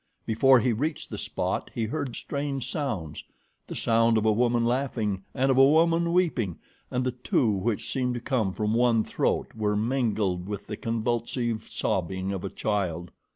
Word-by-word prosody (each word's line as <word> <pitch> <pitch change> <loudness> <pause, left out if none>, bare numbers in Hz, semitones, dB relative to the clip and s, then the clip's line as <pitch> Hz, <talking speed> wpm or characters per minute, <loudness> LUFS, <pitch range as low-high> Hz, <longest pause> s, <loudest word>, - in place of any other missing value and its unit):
Before 130 +4 +5
he 125 -1 +1
reached 150 +8 -3
the - - -4
spot - - -2
he 115 - 0
heard 130 +1 -3
strange 140 -3 -3
sounds 105 - -3 0.4
the - - -6
sound 115 0 +3
of 110 - +1
a 110 - +5
woman 120 +2 +2
laughing 115 -6 -1
and 135 +1 +2
of 130 - +3
a 135 - +8
woman 165 +2 +3
weeping, 145 - +1 0.3
and 125 0 -1
the 130 - +1
two 125 -1 +1
which 100 +2 -1
seemed 125 -2 0
to - - -2
come 115 -5 0
from 105 +2 -1
one 115 -1 +3
throat - - -1
were 105 -1 0
mingled 105 -6 0
with 100 -1 -5
the 105 - -5
convulsive 115 0 -2
sobbing 95 -3 -1
of 95 -2 -4
a 100 - -3
child. 90 -6 -2
115 Hz, 175 wpm, -27 LUFS, 105-130 Hz, 0.4 s, a